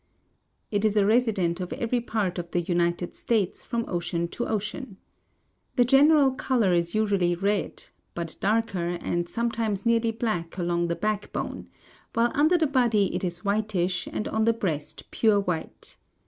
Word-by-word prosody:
It 205 -1 0
is 215 -1 +2
a 200 - +4
resident 205 -6 +2
of 180 -1 -5
every 240 +1 -1
part 205 -6 -2
of 170 0 -6
the 175 - 0
United 175 0 -1
States 215 -6 -1
from 235 -2 -2
ocean 170 -1 -2
to 240 - -4
ocean. 210 +1 -4 0.8
The 245 - +4
general 280 +2 +5
color 245 -7 +1
is 170 +1 0
usually 200 -5 +2
red, 200 +2 -1 0.3
but 170 -2 -2
darker, 195 -5 0
and 175 0 -2
sometimes 230 -3 -2
nearly 230 0 +3
black 215 -7 -3
along 175 -1 0
the 170 - -1
backbone, 210 +1 -3 0.5
while 235 +1 +3
under 310 +5 +4
the 325 - +2
body 240 -8 +2
it 180 - -2
is 175 +1 -4
whitish 200 -3 0
and - - -3
on 220 0 0
the 230 - +4
breast 165 -10 -4
pure 215 -3 +3
white. 180 -5 -4
205 Hz, 160 wpm, -26 LUFS, 175-230 Hz, 0.8 s, general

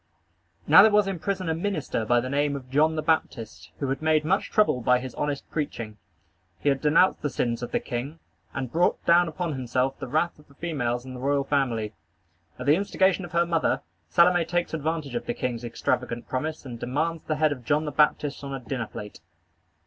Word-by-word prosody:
Now - - +9
there 220 - +7
was 210 -1 +4
in 195 -3 -3
prison 190 0 -2
a 160 - +1
minister 165 - -2
by 120 +2 +3
the 130 - -4
name 145 +2 0
of 130 -2 -8
John 155 +3 +3
the 155 - -2
Baptist, 110 - -1
who 140 - -2
had 135 - -2
made 155 -1 +2
much 190 +5 +1
trouble 210 -12 +2
by 125 +2 +4
his 130 +1 -6
honest 145 -1 -3
preaching. 115 -8 -4 0.6
He 145 - +1
had 135 -1 +1
denounced 155 +5 +4
the 145 - -1
sins 120 -2 -1
of 120 - -5
the - - +1
king, 130 +6 -5 0.3
and 125 +6 -4
brought 175 +2 +1
down 175 +1 +5
upon 165 0 -3
himself 130 +1 -1
the - - -5
wrath 155 +5 0
of 150 - -19
the 140 - -21
females 125 -8 -2
in 130 - -8
the 125 - -7
royal 140 +2 +1
family. 125 -7 0 0.6
At - - -6
the 145 - +5
instigation 190 -1 +1
of 175 - -12
her 170 0 +3
mother, 165 -2 +1 0.3
Salome 175 - +5
takes 175 +1 -2
advantage 155 -3 -2
of 120 0 -4
the - - -2
king's 120 -2 -3
extravagant 120 0 -2
promise 155 +4 -3
and 120 -3 -7
demands 155 +7 -1
the 155 - -1
head 155 0 +2
of 130 -4 -5
John 150 +6 +1
the 150 - -3
Baptist 150 -1 +1
on 140 -1 -4
a - - -5
dinner 125 -1 -4
plate. 105 0 -9
145 Hz, 215 wpm, -26 LUFS, 125-165 Hz, 0.6 s, Now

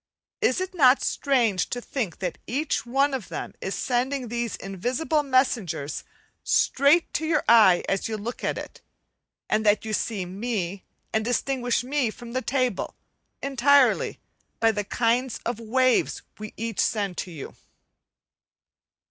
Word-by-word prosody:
Is 255 - +2
it 370 0 -3
not 270 -6 +5
strange 235 -9 +1
to 245 - -3
think 235 - -4
that 180 -3 -4
each 275 -1 -1
one 275 +3 +2
of 255 -7 -3
them - - -5
is 190 - -3
sending 255 0 -1
these 235 -1 -2
invisible 245 - -1
messengers 230 - 0 0.4
straight 285 +6 +3
to 315 - -1
your 315 -2 +2
eye 210 -7 +6
as 195 - 0
you 220 - -2
look 225 +4 -6
at - - -1
it; - - -8 0.7
and 215 - +1
that 210 +1 +3
you 220 - -3
see 205 -3 -1
me, 195 -1 -4 0.3
and 220 - +1
distinguish 245 +1 0
me 265 -2 0
from 235 +2 -10
the 255 - 0
table, 255 -6 -1 0.5
entirely 275 0 +3 0.4
by 225 0 +4
the 210 -1 -2
kind 240 +4 0
of 235 -2 -2
waves 255 +2 +1 0.2
we 215 0 -8
each 225 -1 -4
send 200 -4 0
to - - -4
you? 155 -6 -8
240 Hz, 150 wpm, -25 LUFS, 210-265 Hz, 0.7 s, eye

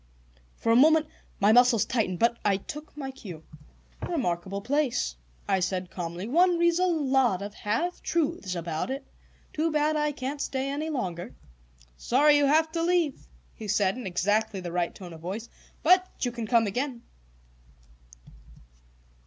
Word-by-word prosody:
For 230 - 0
a - - +5
moment 310 +4 +6 0.3
my 205 +1 +5
muscles 245 -2 +5
tightened, 215 -7 -1
but 235 +4 +2
I 200 -2 +2
took 300 - -9
my 270 -2 -5
cue. 190 - -10 0.7
"Remarkable 195 - -2
place," 260 - 0 0.3
I 190 - +2
said 180 0 -2
calmly; 175 +2 -5
"one 345 +6 +4
reads 340 0 +3
a 370 - +3
lot 265 - +2
of 205 0 -6
half 230 +14 -2
truths 305 - -1
about 165 +3 -3
it. 270 +1 -4 0.5
Too 320 +1 0
bad 305 0 +1
I 300 0 +1
can't 280 +1 -4
stay 270 0 -2
any 305 +3 -3
longer." 185 - -4 0.6
"Sorry 290 - +4
you 290 -1 +4
have 315 +2 +3
to 330 0 -2
leave," 335 -4 0 0.3
he 215 - -8
said, 205 -1 +2
in 250 -5 -6
exactly 205 +3 0
the 175 -2 -6
right 175 0 -1
tone 180 -3 -9
of 160 - -12
voice. 200 +7 -5 0.3
"But 370 0 +5
you 245 - 0
can 230 -2 -5
come 230 -1 +4
again." 245 +4 -3
245 Hz, 160 wpm, -27 LUFS, 195-300 Hz, 0.7 s, moment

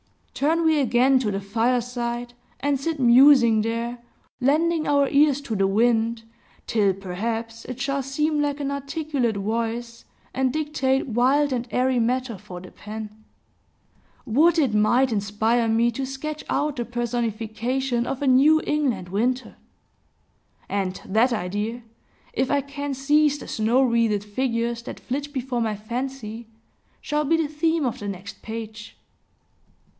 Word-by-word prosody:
Turn 325 +4 +1
we 315 -2 +4
again 260 0 +3
to 235 -5 -1
the 195 -1 -2
fireside, 240 +3 -1 0.3
and 280 0 0
sit 315 +2 -3
musing 245 -2 +6
there, 230 +2 -3 0.4
lending 310 +5 +2
our 285 -1 +3
ears 285 -1 +4
to 240 -6 -4
the 195 -1 +2
wind, 225 +2 +1 0.4
till 205 -4 +2
perhaps 225 +5 -4
it 255 0 -7
shall 275 +1 -1
seem 295 +3 0
like 290 0 -1
an 280 -1 -2
articulate 280 -5 -2
voice, 230 +3 -3 0.3
and 260 -1 +1
dictate 275 -3 0
wild 265 +4 +2
and 245 -1 -2
airy 255 0 +1
matter 245 -2 -1
for 185 -3 -9
the 185 - -12
pen. 215 0 -9 1.0
Would 315 +9 +3
it 275 -9 +2
might 240 +5 +3
inspire 220 +3 +1
me 230 +2 +2
to 265 +3 -4
sketch 300 +3 -5
out 295 -2 0
the 240 - -2
personification 240 +1 -2
of 270 +1 -3
a - - +1
New 280 +5 +6
England 250 -12 -1
winter! 245 +7 -1 1.1
And 190 -2 -2
that 225 +6 +2
idea, 210 +3 -3 0.5
if 260 - 0
I 285 -1 +2
can 280 0 -5
seize 295 +2 +3
the - - -10
snow 230 +5 +2
wreathed 230 -4 +2
figures 235 +1 -2
that - - -8
flit 285 +3 -4
before 260 -3 -2
my 220 -2 -1
fancy, 235 0 -5 0.5
shall 300 0 -1
be 325 +3 +3
the 325 -2 0
theme 320 +1 0
of 245 - -2
the 205 - -6
next 200 +1 -7
page. 220 -1 -8
245 Hz, 145 wpm, -24 LUFS, 225-280 Hz, 1.1 s, musing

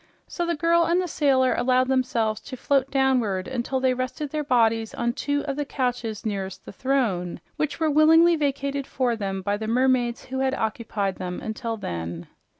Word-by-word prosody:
So 345 -1 -3
the 340 - 0
girl 335 +2 +3
and 340 +2 +2
the 365 - -1
sailor 270 -5 +2
allowed 255 +1 +2
themselves 230 -5 0
to 260 - -8
float 275 +1 +1
downward 250 -9 +1
until 260 +1 -2
they 260 -1 +2
rested 255 +3 -4
their 305 -1 -2
bodies 225 -4 +2
on 235 0 0
two 285 +2 -1
of 275 -1 -3
the 295 - 0
couches 245 -6 -3
nearest 195 -3 -4
the - - -8
throne, 215 -9 -1 0.2
which 305 0 -2
were 315 -2 +2
willingly 325 +3 +6
vacated 280 -2 -1
for 250 -3 0
them 195 -3 -3
by 205 +2 0
the 220 +1 -5
mermaids 245 0 +1
who 265 +1 -3
occupied 220 -6 -1
them 180 -1 -4
until 225 +1 -4
then. 85 - -5
255 Hz, 180 wpm, -25 LUFS, 220-280 Hz, 0.2 s, willingly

